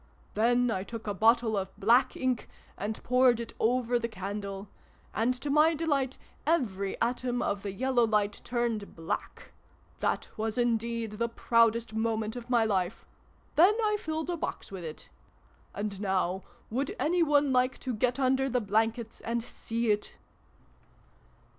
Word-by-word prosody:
Then 240 +3 +3
I 190 -3 -1
took 225 +2 -8
a 205 - -1
bottle 225 +2 +3
of 190 -1 -1
Black 235 +6 +4
ink, 255 -3 -1 0.3
and 215 +2 -4
poured 250 -1 +4
it 235 - -6
over 245 +1 +2
the 230 - -2
candle: 200 -1 -5 0.5
and, 225 +3 +2
to 290 - -2
my 310 +3 +5
delight, 285 -5 0 0.3
every 205 - 0
atom 245 +1 0
of 200 -1 -1
the 200 0 -4
Yellow 245 +2 +2
Light 210 -1 0
turned 235 -4 -2
Black! 165 0 -5 0.5
That - - 0
was 220 +1 -2
indeed 230 -2 0
the 235 0 +1
proudest 230 -1 +2
moment 220 0 -1
of 245 0 -8
my 235 -3 +4
life! 190 -2 -1 0.5
Then 360 +8 +6
I 425 -2 +2
filled 315 +1 -3
a 345 - -2
box - - -5
with 190 -3 -6
it. 155 -1 -8 0.6
And 205 -1 -4
now 190 -2 0 0.3
would 270 +5 -1
any 345 +3 +1
one 290 -3 +4
like 255 +1 +2
to 255 - -2
get 245 +3 +1
under 265 0 +2
the 250 0 +1
blankets 225 +2 -1
and 230 0 -2
see 230 -1 -2
it 210 0 -1
230 Hz, 155 wpm, -29 LUFS, 210-255 Hz, 0.6 s, Then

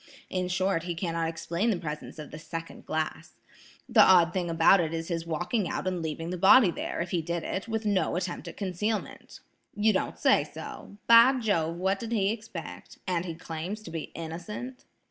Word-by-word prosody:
In 185 -1 -1
short, 185 -1 +1
he 175 -1 -3
cannot 165 -1 -1
explain 170 +6 -1
the 210 - +1
presence 150 -2 -6
of 155 -1 -8
the 155 - -8
second 165 +1 -8
glass. 155 0 -3 0.5
The - - +6
odd 175 -2 +6
thing 180 -2 -1
about 165 +4 +5
it 165 -1 -1
is 165 +1 -4
his 165 -1 -3
walking 175 +4 -1
out - - -3
and 185 -2 -1
leaving 165 +1 -4
the 180 - -4
body 255 -3 +7
there, - - -4
if 175 - -4
he 175 - +1
did 170 0 -3
it, 190 - -3
with 225 -1 -2
no 200 -5 +1
attempt 180 0 -3
at - - -8
concealment." 210 +3 -3 0.3
"You 215 +1 +3
don't 190 - -1
say - - +4
so! 200 - -9
By 235 +3 +8
Jove, 200 -10 0
what 190 +3 0
did 230 +1 -4
he 200 -2 +2
expect? 225 0 -8
And 180 -2 -1
he 165 -2 -5
claims 170 +7 -6
to 165 - -9
be 165 -1 -5
innocent?" 175 +10 -7
180 Hz, 200 wpm, -28 LUFS, 165-205 Hz, 0.5 s, By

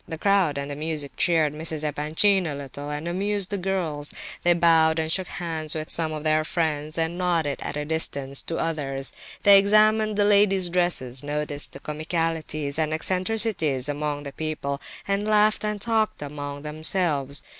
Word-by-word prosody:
The 160 - -5
crowd 190 -5 +2
and 140 +1 -4
the - - -4
music 150 -1 -3
cheered 160 -4 +2
Mrs. 155 0 -1
Epanchin 155 +6 +2
a 145 - -3
little, 140 +1 -7
and 150 +3 -4
amused 200 +2 -1
the 200 - -1
girls; 170 -6 -2 0.3
they 175 - +4
bowed 165 -2 +4
and 160 0 -1
shook 185 +1 0
hands 160 -3 -3
with 155 0 -4
some 160 -2 +2
of 155 -1 -5
their 155 0 +2
friends 155 -1 -1
and 165 +2 -1
nodded 165 -6 0
at - - -4
a 150 - -3
distance 140 -3 -1
to 165 - -4
others; 135 -4 -2 0.3
they 200 -1 +9
examined 215 +1 +4
the 205 - +3
ladies' 200 -3 +4
dresses, 170 -8 +1
noticed 145 -1 -3
comicalities 155 -1 -1
and 155 0 +1
eccentricities 185 - +1
among 145 0 -3
the 140 -1 -7
people, 150 -3 -3 0.3
and 200 +1 0
laughed 215 0 +3
and 210 -1 -2
talked 220 -7 0
among 145 0 -6
themselves. 150 -2 -1
160 Hz, 165 wpm, -25 LUFS, 145-185 Hz, 0.3 s, they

